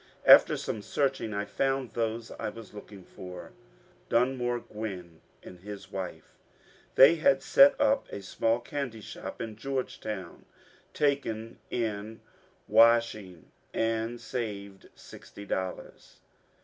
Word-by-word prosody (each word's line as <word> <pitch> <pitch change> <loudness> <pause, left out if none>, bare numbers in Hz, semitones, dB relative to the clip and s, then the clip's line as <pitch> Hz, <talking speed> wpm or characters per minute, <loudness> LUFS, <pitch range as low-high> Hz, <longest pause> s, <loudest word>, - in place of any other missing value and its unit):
After - - +8
some 110 - -4
searching 135 0 -1
I 100 0 -2
found 135 +3 -1
those 115 0 -3
I - - -2
was 115 -1 -11
looking 105 -2 -11
for, 90 0 -10 0.3
— - - -32
Dunmore 120 0 +1
Gwinn 95 -8 -7 0.2
and 90 - -12
his 100 +1 -9
wife. 90 -5 -6 0.6
They 145 +6 +8
had 135 -4 +3
set 280 +1 +6
up 275 -1 +2
a 100 - -6
small 115 +3 0
candy 125 -3 -5
shop - - -8
in 110 -2 -5
Georgetown, 110 -7 -5 0.5
taken 115 -6 -1
in 110 -1 -3 0.5
washing, 115 -7 +3 0.2
and 115 +1 -1
saved 100 -6 -6
sixty 100 - -12
dollars. 95 -2 -5
110 Hz, 120 wpm, -29 LUFS, 100-120 Hz, 0.6 s, After